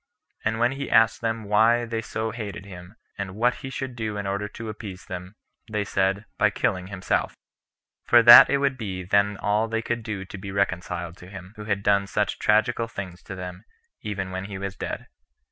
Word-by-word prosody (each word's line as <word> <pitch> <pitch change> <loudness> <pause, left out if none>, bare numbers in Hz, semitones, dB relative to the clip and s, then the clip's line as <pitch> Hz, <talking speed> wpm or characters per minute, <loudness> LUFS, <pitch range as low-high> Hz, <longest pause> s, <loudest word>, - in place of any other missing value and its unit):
And 110 +1 0
when 120 +2 +2
he 140 +1 -5
asked 115 -1 +4
them 115 -1 -1
why 110 +3 +3
they 115 -1 -3
so 110 0 -3
hated 105 -4 -6
him, 90 +1 -11 0.2
and 95 -1 -4
what 120 +3 +2
he 135 - -7
should 130 -1 -5
do 110 -3 -3
in 100 - -4
order 100 +1 -2
to 115 +2 -8
appease 105 -3 -8
them, 90 +2 -7 0.4
they 105 -1 0
said, 95 +1 0
by - - +5
killing 90 0 -1
himself; 95 -2 -1 0.7
for 120 -1 +6
that 120 +1 +11
it 140 - +3
would 140 -2 0
be 95 -4 -4
then 100 +2 +2
all 105 +3 +1
they 115 0 -2
could 120 0 -2
do 105 -4 -5
to 95 - -9
be 95 0 -7
reconciled 90 -3 -2
to 90 - -13
him, 95 0 -10
who 105 -1 -8
had 100 -2 -1
done 100 -1 +3
such 105 +1 -1
tragical 115 +2 +2
things 95 -5 -7
to 95 - -8
them, 90 +1 -7 0.4
even 100 -3 -4
when 95 +1 -4
he 100 -1 -6
was 100 0 -5
dead. - - -5
105 Hz, 205 wpm, -25 LUFS, 95-115 Hz, 0.7 s, that